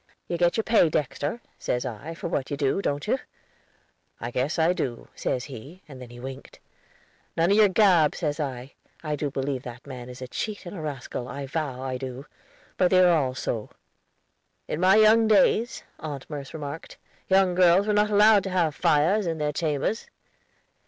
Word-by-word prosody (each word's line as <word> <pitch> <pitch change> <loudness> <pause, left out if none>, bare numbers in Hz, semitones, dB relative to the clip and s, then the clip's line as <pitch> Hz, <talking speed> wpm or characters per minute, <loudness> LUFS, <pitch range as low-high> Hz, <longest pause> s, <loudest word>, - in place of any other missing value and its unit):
'You 175 - -2
get 175 +3 +2
your 225 - +1
pay, 215 -8 +4
Dexter,' 150 - -2 0.2
says 125 +1 -2
I, 130 +7 -6
'for - - -5
what 140 -5 -2
you 145 - -3
do, 140 +6 +1
don't 145 -5 -2
you?' - - +1 1.0
'I 120 - -5
guess 130 +8 -1
I 165 +2 +3
do,' 125 -9 -4
says 125 - -2
he, 140 - -10
and 135 -4 -11
then 125 - -9
he 120 0 -12
winked. 135 +2 -9 0.8
'None 165 +3 +3
of 200 - +4
your 215 -1 +7
gab,' 185 -6 +4
says 150 -2 -2
I. 135 -2 -4 0.3
I 150 -2 -2
do 145 0 -2
believe 135 -1 -3
that 125 -1 -10
man 125 -3 -8
is 125 - -10
a 130 - -6
cheat 205 - -5
and 175 - -7
a 170 - -6
rascal, 135 -4 -5
I 140 +1 -6
vow 135 -3 -4
I 130 -1 -3
do. 130 +1 -7 0.5
But 180 - +3
they 185 - +4
are 180 -1 +6
all 130 -5 0
so." 115 -4 -3 1.0
"In 150 - -3
my 185 +3 +5
young 220 +1 +6
days," 215 +3 +3 0.2
Aunt 145 -4 -6
Merce 140 -2 -6
remarked, 150 0 -7 0.3
"young 190 -1 +4
girls 180 +2 +5
were 210 - +1
not 210 0 +3
allowed 210 0 +5
to - - -2
have 175 -4 +1
fires 170 +9 +2
in 165 -1 -2
their 150 -1 -1
chambers." 155 +8 -1
150 Hz, 195 wpm, -26 LUFS, 135-185 Hz, 1.0 s, your